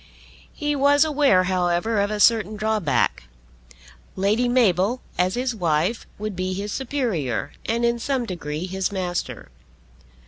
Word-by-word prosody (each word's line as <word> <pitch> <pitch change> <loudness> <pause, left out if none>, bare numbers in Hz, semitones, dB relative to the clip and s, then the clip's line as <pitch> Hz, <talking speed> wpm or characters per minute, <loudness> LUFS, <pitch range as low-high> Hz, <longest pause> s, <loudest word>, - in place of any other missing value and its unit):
He 295 -1 -2
was 285 +2 +4
aware, 285 -11 +3
however, 185 +3 +1
of 200 - 0
a 210 0 -3
certain 215 -1 +3
drawback. 210 - 0 0.9
Lady 210 +6 +1
Mabel 230 -1 +2
as 180 +1 +1
his 250 0 -1
wife 175 +2 0
would 215 -1 -4
be 185 +1 -2
his 205 +2 -4
superior, 235 - -2 0.2
and 235 +1 +1
in 235 0 +1
some 260 0 -1
degree 165 -4 -4
his 190 +1 -2
master. 180 -3 -4
210 Hz, 135 wpm, -23 LUFS, 180-240 Hz, 0.9 s, was